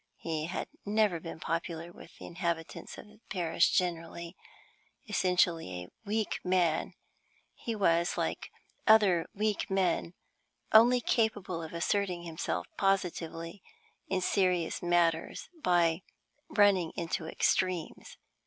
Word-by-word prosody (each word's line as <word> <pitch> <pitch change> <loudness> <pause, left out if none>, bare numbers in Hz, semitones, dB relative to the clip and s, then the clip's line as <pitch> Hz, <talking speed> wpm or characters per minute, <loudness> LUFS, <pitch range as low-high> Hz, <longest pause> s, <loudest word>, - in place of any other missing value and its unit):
He 160 -2 -3
had 180 - -4 0.2
never 210 -4 +2
been 165 0 -8
popular 165 +1 -3
with 175 - -15
the - - -10
inhabitants 170 -2 -4
of - - -10
his 210 0 -19
parish 175 -3 +2
generally. 170 0 -2 0.7
Essentially 180 - +1
a 90 - -13 0.2
weak 215 +1 -1
man, 180 -3 +1 0.6
he 230 - -5
was, 170 -4 +2
like - - -2 0.4
other 205 -6 +5
weak 210 0 -1
men, 180 -2 0 0.6
only 240 +3 +7
capable 210 -8 0
of 160 - -7
asserting 180 +1 -1
himself 165 -1 -3
positively 180 -2 -1 0.5
in 190 -1 0
serious 180 -3 +1
matters 170 -2 +1
by 175 - +3 0.5
running 195 -5 +3
into 165 -1 -3
extremes. 180 0 -1
175 Hz, 115 wpm, -31 LUFS, 165-200 Hz, 0.7 s, only